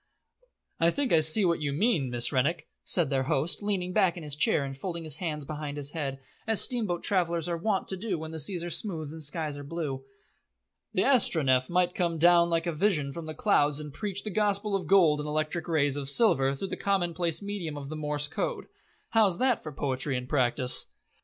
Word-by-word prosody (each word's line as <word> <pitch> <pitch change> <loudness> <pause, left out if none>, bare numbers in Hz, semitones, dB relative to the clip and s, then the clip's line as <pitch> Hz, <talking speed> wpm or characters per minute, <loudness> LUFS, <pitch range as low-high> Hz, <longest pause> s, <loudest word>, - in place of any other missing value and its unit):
"I 165 - +4
think 270 +6 -1
I 165 - +6
see 155 +6 +5
what 170 -3 0
you 145 -1 -1
mean, 165 - +1
Miss 120 0 +2
Rennick," 150 +6 0 0.2
said 165 -6 +1
their 135 -1 +1
host, 150 +6 0
leaning 190 -3 -2
back 190 -4 +2
in 170 - -7
his 145 -2 -2
chair 150 -1 +2
and 135 0 -6
folding 170 +4 -5
his 155 -2 -4
hands 150 -4 -4
behind 150 -1 -6
his 145 0 -5
head, 140 -5 -4 0.3
as 220 -2 +1
steamboat 215 -9 -1
travellers 170 -4 +1
are 170 - -1
wont 195 +3 -1
to 190 - -2
do 195 -2 -3
when 160 0 -7
seas 170 +3 +1
are 175 - -5
smooth 165 -4 -1
and 160 0 -9
skies 150 -1 -2
are - - -8
blue. 140 -3 -5 0.9
"The 185 - +1
Astronef 150 - +2
might 180 0 +1
come 170 -2 -1
down 170 +1 +5
like 165 0 0
a 170 - -1
vision 155 -5 0
from 165 +1 -7
the 155 - -6
clouds 150 -8 +2
and 150 -2 -8
preach 200 0 -3
the 215 - -4
Gospel 205 0 +1
of 195 - -3
Gold 170 -6 +4
in 150 - -6
electric 155 +2 -2
rays 145 -4 +1
of 140 -1 -1
silver 140 - +4
through 190 +8 -5
the - - -4
commonplace 175 -3 0
medium 190 -7 -5
of 140 -1 -8
the 155 - -5
Morse 150 -1 -1
Code. 160 - -4 0.5
How's 210 -6 +3
that 255 -1 +1
for 155 - -7
poetry 135 -1 -2
and 125 0 -6
practice?" 125 -1 +4
165 Hz, 210 wpm, -28 LUFS, 145-185 Hz, 0.9 s, I